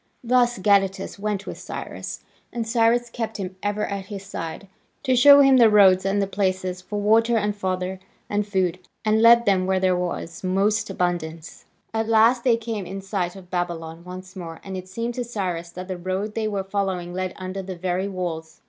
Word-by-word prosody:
Thus 245 0 +3
Gadatas 195 0 +1
went 205 -1 -2
with - - -7
Cyrus, - - -7 0.3
and 230 -2 -3
Cyrus 235 +1 +3
kept 225 -2 -4
him 190 -2 -5
ever 205 +1 -1
at 200 -1 -5
his 200 -2 -7
side, 165 0 -6 0.4
to 260 -2 +2
show 285 +3 +8
him 270 -1 +6
the 235 -3 +7
roads 195 -3 +6
and 195 +1 +1
the 200 - +2
places 185 -2 -1
for 205 +3 -4
water 225 +3 +3
and 210 -1 0
fodder 185 -1 -3 0.3
and 205 0 -1
food, 185 -3 0 0.3
and 215 +1 +3
lead 235 +1 +7
them 185 -3 +2
where 190 0 +2
there 185 -1 +2
was 175 -1 -4
most 200 +3 +1
abundance. 170 -3 -3 0.3
At 225 0 -1
last 230 +2 +4
they 240 -3 +4
came 220 -5 -4
in 195 +1 -6
sight 190 -2 -2
of 185 -2 -13
Babylon 170 -2 -3
once 185 +1 -9
more, 165 -3 -7
and 195 -1 -6
it 185 0 -6
seemed 230 +5 -3
to 245 - -3
Cyrus 185 -7 -3
that 180 +2 -8
the 185 -1 -4
road 190 +4 -3
they 220 0 -1
were 200 -2 -2
following 190 -3 -2
led 185 0 -3
under 185 +1 -5
the 190 -1 -6
very 185 +2 -1
walls. 170 -4 -5
195 Hz, 195 wpm, -23 LUFS, 185-215 Hz, 0.4 s, show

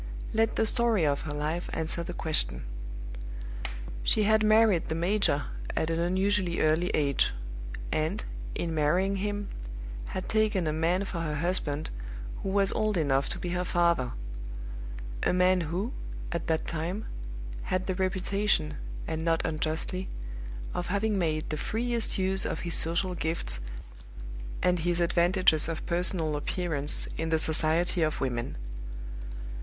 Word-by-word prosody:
Let 225 0 +3
the 225 - +3
story 230 -6 +4
of 140 -1 +2
her - - -2
life 155 +4 -2
answer 160 +1 -1
the 175 +1 -5
question. 155 -2 0 1.4
She 215 - +3
had 215 +1 +5
married 215 -4 +5
the 160 - 0
major 170 -4 +2 0.3
at 160 - +1
an 165 - +1
unusually 185 0 +2
early 160 +3 +3
age; 140 - +2 0.6
and, 160 +7 0 0.3
in 170 -1 -1
marrying 175 +6 +2
him, 205 +1 -2 0.6
had 185 - -4
taken 215 -4 +2
a 155 - +1
man 170 +4 +2
for 185 -3 -3
her 155 -2 -1
husband 155 -2 0 0.5
who 195 - -2
was 195 0 +3
old 215 -2 +1
enough 140 -4 +2
to - - 0
be 175 - -3
her 180 +1 0
father 170 -8 +2 1.1
a - - +2
man 180 0 +4
who, 195 +9 -1 0.4
at 170 - -2
that 160 0 +1
time, 170 +6 -2 0.6
had 185 0 0
the 190 - 0
reputation, 185 -3 +1 0.3
and 160 0 -2
not 165 -1 +2
unjustly, 160 +4 -1 0.6
of 175 - -2
having 205 +2 +1
made 155 -3 0
the 155 - -1
freest 235 +5 0
use 190 0 +1
of - - -2
his 170 -2 -3
social 175 +3 +2
gifts 160 - -2 1.0
and 180 -1 +4
his 175 +1 +1
advantages 170 -2 +4
of 165 - -3
personal 170 -3 +2
appearance 150 -1 -1
in 160 0 0
the 160 - +4
society 160 +2 +3
of 155 -1 +1
women. 120 - -1
175 Hz, 145 wpm, -29 LUFS, 160-190 Hz, 1.4 s, had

